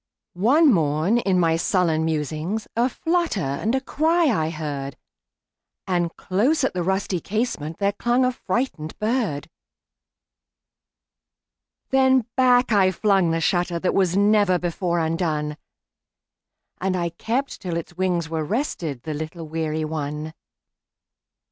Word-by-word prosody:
One 265 - +4
morn, 160 +6 +2
in 190 -5 +1
my 165 -2 +3
sullen 165 -3 +1
musings,A 160 - -1
flutter 335 - 0
and 215 - -1
cry 325 +3 +2
I 160 0 0
heard; 145 -4 -5 0.9
And 175 -2 0
close 245 +12 +1
at 265 - +1
the 180 - -2
rusty 190 0 -1
casementThere 200 -3 -2
clung 245 +2 +2
a 255 - +2
frightened 235 - -3
bird. 215 - -1 2.4
Then 260 -2 +4
back 250 -1 +4
I 195 -3 +5
flung 190 -1 +2
the 165 - +1
shutterThat 175 +1 0
was 190 -1 +2
never 205 -2 +4
before 175 0 -2
undone, 160 -2 -1 1.2
And 185 0 0
I 170 -1 -1
kept 245 +10 -3
till 175 -3 -3
its 170 +1 -7
wings 180 -2 0
were 160 -1 -2
restedThe 160 - -3
little 160 +2 -6
weary 155 0 -2
one. 155 0 -4
180 Hz, 115 wpm, -23 LUFS, 160-225 Hz, 2.4 s, I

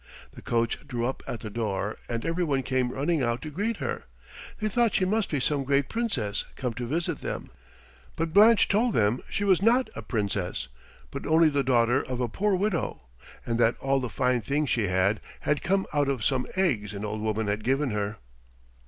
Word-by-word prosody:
The - - -11
coach 115 -1 0
drew 120 -4 -2
up 130 - -2
at 115 - -4
the 110 - -6
door, 105 -2 -2
and 115 +1 -3
every 165 +2 0
one 140 -5 0
came 130 -1 0
running 150 +4 0
out 120 -1 0
to 155 - -6
greet 205 +9 -1
her. - - -4 0.5
They 215 - 0
thought 230 +1 +2
she 185 - +3
must 215 +3 0
be 145 - 0
some 140 +2 0
great 140 0 +1
Princess 180 - -1
come 125 -3 -3
to 120 +1 -4
visit 165 +6 -1
them, - - -5 0.6
but 165 0 -2
Blanche 215 +3 +7
told 220 +3 +2
them 110 +3 +2
she 205 - -1
was 190 -3 +4
not 240 +5 +3
a - - -5
Princess, 100 - -2 0.4
but 140 - -5
only 160 0 +5
the 140 -1 +1
daughter 125 0 +3
of 125 -1 -4
a 125 - +1
poor 195 - +1
widow, 185 - -1 0.4
and 115 -1 -1
that 115 0 +3
all 135 0 +1
the 125 -2 -3
fine 125 -1 +1
things 145 +4 0
she 110 -4 +1
had, 95 +3 +2 0.2
had 150 -1 0
come 195 +2 +1
out 145 -1 +2
of 125 -7 -1
some 130 -2 +1
eggs 120 - +1
an 100 +1 -4
old 105 +1 -3
woman 110 0 -1
had 105 +1 -1
given 135 +1 +1
her. 105 0 -2
130 Hz, 205 wpm, -27 LUFS, 115-165 Hz, 0.6 s, Blanche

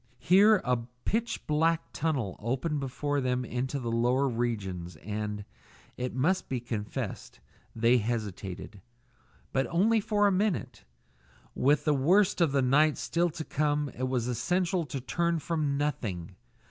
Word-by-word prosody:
Here 200 +5 +6
a 125 -1 +2 0.3
pitch 230 +2 -1
black 160 +2 +1
tunnel 135 - -1
opened 135 +7 -1
before 140 +1 -2
them 125 -1 0
into 130 +3 -2
the 120 -3 -3
lower 125 +4 +2
regions, 100 - -3
and 105 +4 -4 0.5
it 125 -1 -4
must 170 +9 +1
be 130 - -1
confessed 110 - -5 0.4
they 115 +2 +4
hesitated. 105 -3 -4 0.7
But 135 0 +1
only 215 +7 +3
for 205 0 +2
a 200 - +4
minute. 185 - -1 0.7
With 145 +2 +2
the 150 - +4
worst 180 +8 +3
of 165 -4 +4
the 135 -1 +2
night 150 +4 +4
still 175 +1 0
to 160 -1 -6
come 145 -1 0
it 130 0 -3
was 125 -2 -1
essential 175 +6 0
to 135 +1 -4
turn 170 +6 0
from 150 -3 -1
nothing. 110 - -3
135 Hz, 145 wpm, -29 LUFS, 120-165 Hz, 0.7 s, Here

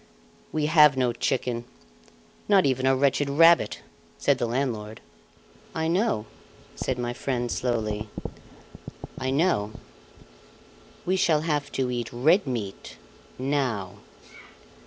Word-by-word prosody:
"We 155 -1 0
have 150 -3 +6
no 125 -2 +1
chicken 120 -1 -1 0.9
not 195 -2 +5
even 130 -1 +1
a 135 - +4
wretched 140 +1 +1
rabbit," 165 +4 +4 0.3
said 140 -2 +1
the 120 - 0
landlord. 115 -4 -3 0.8
"I 160 0 -1
know," 175 - +1 0.5
said 130 - -2
my 120 0 -2
friend 120 -2 -2
slowly; 110 -3 -2 1.1
"I 130 - -2
know 135 - +1 1.3
We 185 +1 +1
shall 155 -4 +3
have 150 -3 -1
to 130 -2 -1
eat 120 -2 -3
red 155 +10 +3
meat 110 -7 -5 0.4
now." 125 -8 -2
130 Hz, 115 wpm, -26 LUFS, 120-150 Hz, 1.3 s, have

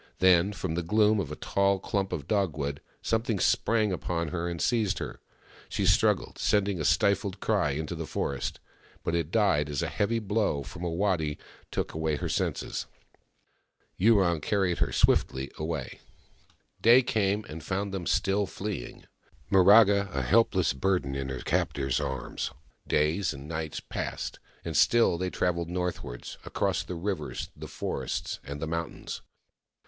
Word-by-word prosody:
Then, 90 +1 +5
from 95 -5 -3
the 85 - -1
gloom 105 +4 +3
of 80 -7 -3
a - - -4
tall 100 +3 +1
clump 95 0 -2
of 70 -5 -4
dogwood, 75 -9 -1 0.2
something 115 -2 0
sprang 110 0 +2
upon 85 -3 -2
her 85 +3 -2
and 85 -1 -4
seized 110 -3 +1
her. - - -6 0.5
She - - -1
struggled, - - +2
sending 100 -4 +1
a - - -1
stifled 100 -1 +2
cry 95 -11 +1
into 80 +3 -3
the 80 -2 -5
forest— 70 - -3 0.4
but 85 - -1
it 85 -2 0
died 90 -8 +2
as 70 -2 -1
a - - 0
heavy 110 +3 0
blow 105 -9 0
from 90 +5 -8
a 85 - 0
waddy 85 -4 0 0.3
took - - -3
away 80 -1 0
her - - -3
senses. - - -2 1.1
Yurong 95 -6 +4
carried 95 -1 +1
her - - +1
swiftly 65 +1 +2
away. 75 -4 -4 0.8
Day 120 +3 +7
came, 105 -3 0
and 80 0 -8
found 100 +3 -2
them 90 -4 -3
still 100 +2 +1
fleeing, 100 - -6 0.5
Miraga 100 +1 +6
a 70 - 0
helpless - - +3
burden 90 -1 0
in 70 -1 -3
her 65 -1 -4
captor's 70 -2 0
arms. 65 -1 -3 0.4
Days 80 +3 +1
and 70 +2 -9
nights 80 -1 -4
passed, - - -5 0.3
and - - -4
still 115 -8 +4
they 90 0 -1
travelled 85 -2 -1
northwards, 90 -9 -4
across - - 0
the 90 - -6
rivers, 85 -3 -3
the - - -8
forest, - - -3
and 70 +1 -6
the 80 - -2
mountains. 85 +1 -4
90 Hz, 155 wpm, -28 LUFS, 75-100 Hz, 1.1 s, Day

